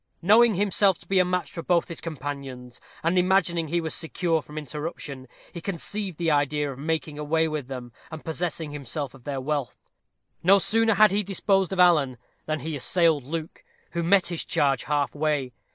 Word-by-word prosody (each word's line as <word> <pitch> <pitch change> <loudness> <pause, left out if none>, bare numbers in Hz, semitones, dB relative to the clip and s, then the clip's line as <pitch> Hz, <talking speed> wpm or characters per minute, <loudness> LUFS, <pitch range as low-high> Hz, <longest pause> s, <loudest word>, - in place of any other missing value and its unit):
Knowing 215 +4 +5
himself 195 -1 +3
to - - -20
be 195 -1 +3
a - - +6
match 180 0 -2
for 165 - -6
both 170 0 +1
his 170 - -6
companions, 135 -5 -7 0.2
and 170 +3 +3
imagining 180 -3 +2
he 170 +3 0
was 160 -2 -3
secure 165 0 -1
from 150 +1 -12
interruption, 150 -2 -6 0.3
he 170 - -7
conceived 195 0 -4
the 165 -2 +1
idea 145 0 +1
of 135 - -10
making 155 -1 -2
away 160 +2 +1
with 155 -4 -4
them, 125 -3 -7 0.2
and 160 -1 -9
possessing 160 -1 -3
himself 140 -1 -5
of 135 -3 -17
their 140 -2 -3
wealth. 140 -1 -2 0.7
No 195 +3 +6
sooner 225 +3 +3
had 210 +1 +6
he 205 +2 +2
disposed 195 -1 +1
of 190 - -3
Alan, 150 -8 +4 0.3
than 155 -1 -2
he 160 -1 -4
assailed 160 +1 +2
Luke, 160 +2 -5 0.3
who 170 - -2
met 180 +2 +4
his 170 -2 -2
charge 135 -3 +1
half 145 -1 0
way. 145 -4 -1
160 Hz, 185 wpm, -25 LUFS, 145-180 Hz, 0.7 s, a